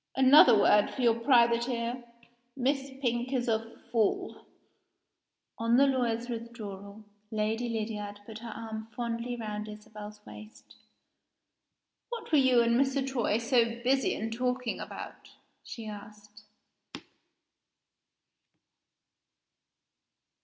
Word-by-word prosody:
Another 265 -3 +7
word 205 0 +4
for 260 - -4
your 235 -1 +5
private 235 0 +3
ear. 240 0 -3 0.5
Miss 270 +1 0
Pink 240 +1 0
is 250 -1 0
a 225 0 -1 0.2
fool." 220 -4 -1 1.1
On 230 +1 +3
the 275 - +6
lawyer's 240 -3 0
withdrawal, 215 -4 -7 0.3
Lady 220 +2 -1
Lydiard 210 -2 -4
put 220 0 -9
her 235 0 -8
arm 220 -1 -7
fondly 235 0 -3
round 215 -2 -5
Isabel's 210 0 -10
waist. 215 +2 -13 1.3
"What 470 -6 -7
were 305 - +5
you 255 -3 +5
and 235 +2 +3
Mr. 270 0 0
Troy 240 -5 0
so 235 +1 +3 0.2
busy 265 +1 +2
in 225 +1 -4
talking 250 +1 -2
about?" - - -9 0.3
she 230 -2 -8
asked. 210 0 -11
235 Hz, 110 wpm, -29 LUFS, 215-250 Hz, 1.3 s, Another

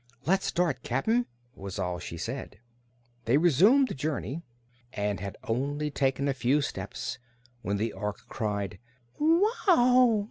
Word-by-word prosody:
"Let's 190 +4 +2
start, 175 -5 0
Cap'n," 220 - +1 0.3
was 100 -3 -7
all 90 -2 -2
she 85 -1 -7
said. - - -5 0.7
They 120 +5 +4
resumed 185 - +5
the - - -4
journey 145 +2 -3 0.5
and 105 -1 -1
had 100 +1 -6
only 145 +6 -1
taken 135 0 0
a 140 - +2
few 135 +2 +2
steps - - -5 0.4
when 100 -2 -1
the 110 +2 -1
Ork 105 -1 -4
cried 100 -4 -3 0.4
"Wow!" 305 - +4
140 Hz, 135 wpm, -28 LUFS, -, 0.7 s, resumed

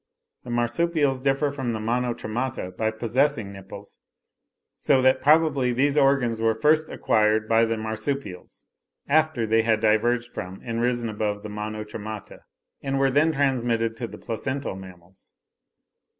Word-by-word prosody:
The 125 - -10
Marsupials 135 +3 0
differ 135 +1 +1
from 130 -4 -3
the 110 - -3
Monotremata 120 -3 -2
by 110 +3 0
possessing 115 0 0
nipples; 100 +1 -11 0.8
so 135 - +3
that 130 0 +4
probably 145 -4 +3
these 140 +3 +1
organs 135 -5 +2
were 115 0 +2
first 155 +3 +3
acquired 110 0 +1
by 115 0 +4
the 115 0 -1
Marsupials, 110 -2 -5 0.4
after 155 -5 +2
they 115 +1 +3
had 110 -1 +1
diverged 120 +3 +1
from, 90 +2 -6
and 115 -1 -3
risen 120 -1 0
above, 105 -1 -3
the 105 - -6
Monotremata, 105 0 -6 0.4
and 135 -1 -2
were 135 0 +2
then 150 +4 +3
transmitted 120 -6 0
to 120 - -4
the - - -10
placental 130 +1 -4
mammals. 95 -1 -14
115 Hz, 140 wpm, -24 LUFS, 110-135 Hz, 0.8 s, that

